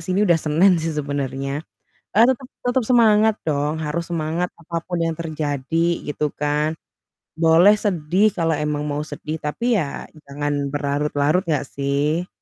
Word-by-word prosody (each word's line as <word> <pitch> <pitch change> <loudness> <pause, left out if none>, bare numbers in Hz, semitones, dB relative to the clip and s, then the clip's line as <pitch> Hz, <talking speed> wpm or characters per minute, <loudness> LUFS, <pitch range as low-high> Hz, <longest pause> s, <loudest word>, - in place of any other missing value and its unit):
sini 185 +1 0
udah 170 -4 +4
Senin 165 +6 +4
sih 165 - -2
sebenernya. 140 -1 -3 0.5
Eee, 225 +3 +6
tetep 260 0 -1 0.2
tetep 245 0 +1
semangat 220 -2 +4
dong 145 +1 0
harus 160 +2 -2
semangat 165 +2 -1
apa 170 +1 -6
pun 175 -1 -2
yang 165 -1 -1
terjadi 155 0 -1 0.2
gitu 150 +1 -3 0.2
kan, 150 +2 0 0.6
boleh 165 +5 +6
sedih 185 +1 +2
kalau 165 -1 +1
emang 150 0 -1
mau 145 -1 -2
sedih 155 +1 -5
tapi 230 +8 +1
ya 140 -4 -4 0.2
jangan 145 +1 -2 0.2
berlarut-larut 145 +3 +1
nggak 150 -4 +1
sih. 145 +5 0
155 Hz, 145 wpm, -21 LUFS, 145-180 Hz, 0.6 s, Eee